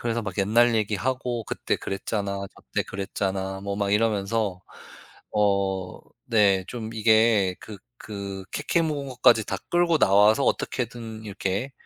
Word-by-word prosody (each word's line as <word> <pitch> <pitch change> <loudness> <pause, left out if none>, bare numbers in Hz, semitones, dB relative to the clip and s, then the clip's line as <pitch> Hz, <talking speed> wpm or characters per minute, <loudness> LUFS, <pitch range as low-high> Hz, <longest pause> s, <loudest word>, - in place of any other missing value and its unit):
그래서 115 0 -1
막 100 -4 -6
옛날 115 +4 +3
얘기하고 120 +3 -1
"그때 - - -2
그랬잖아." 100 +1 -3 0.2
"저 - - -18
때 - - +2
그랬잖아." 95 0 -3
뭐 100 0 -4
막 100 -1 -1
이러면서 105 -2 0 0.7
어 100 -3 0 0.3
네 100 -4 +3
좀 115 -2 -6
이게 110 -3 +4
그 105 -2 -10 0.2
그 100 -2 -7
케케묵은 150 -2 -1
것까지 120 -3 +4
다 - - -2
끌고 175 -1 +3
나와서 105 +6 +5
어떻게든 115 -3 -3
이렇게 100 +5 -3
105 Hz, 280 characters per minute, -25 LUFS, 100-115 Hz, 0.7 s, 나와서